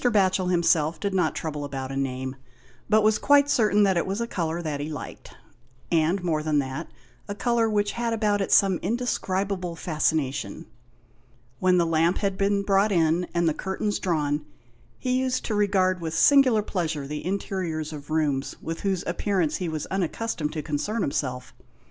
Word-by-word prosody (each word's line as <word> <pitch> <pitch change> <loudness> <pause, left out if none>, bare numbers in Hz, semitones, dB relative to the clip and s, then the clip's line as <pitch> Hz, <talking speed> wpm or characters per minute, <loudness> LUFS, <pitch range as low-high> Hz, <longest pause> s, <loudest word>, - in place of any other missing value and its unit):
Batchel 190 -6 +2
himself 165 -3 +2
did 200 +2 -2
not 180 -4 +1
trouble 150 -2 -4
about 135 -2 -5
a - - -4
name, 130 -1 -3 0.5
but 215 0 +4
was 215 0 +3
quite 285 0 +4
certain 210 -5 +3
that 190 -3 +3
it 170 - 0
was 195 +3 -2
a 235 - 0
colour 170 -7 -2
that 155 -4 -3
he 145 +2 -4
liked; 150 -3 -8 0.5
and 170 +3 +2
more 160 -3 0
than 155 -1 0
that, 135 +3 -3 0.4
a 205 - -4
colour 235 0 +1
which 205 -1 +1
had 235 0 -2
about 210 -2 +1
it 195 - -2
some 195 -3 +5
indescribable 195 -4 -2
fascination. 155 - -1 0.9
When 185 -1 +3
the 170 - +3
lamp 165 +2 +2
had 200 -2 -1
been 200 +1 +1
brought 200 +1 +3
in, 170 0 +2
and 170 -1 +2
the 160 - +2
curtains 190 +4 -2
drawn, 150 -4 0 0.5
he 255 0 0
used 260 -1 -1
to 220 - -2
regard 190 -3 +2
with 160 -1 -3
singular 255 - +5
pleasure 160 -8 -2
the 150 +2 -5
interiors 180 -5 -3
of 145 0 -9
rooms 150 -3 0
with 165 0 -5
whose 190 -3 -1
appearance 175 -1 0
he 180 -3 -3
was 155 -2 -3
unaccustomed 185 -3 -2
to 155 -2 -4
concern 200 +9 -2
himself. 125 -2 -3
180 Hz, 175 wpm, -25 LUFS, 155-205 Hz, 0.9 s, some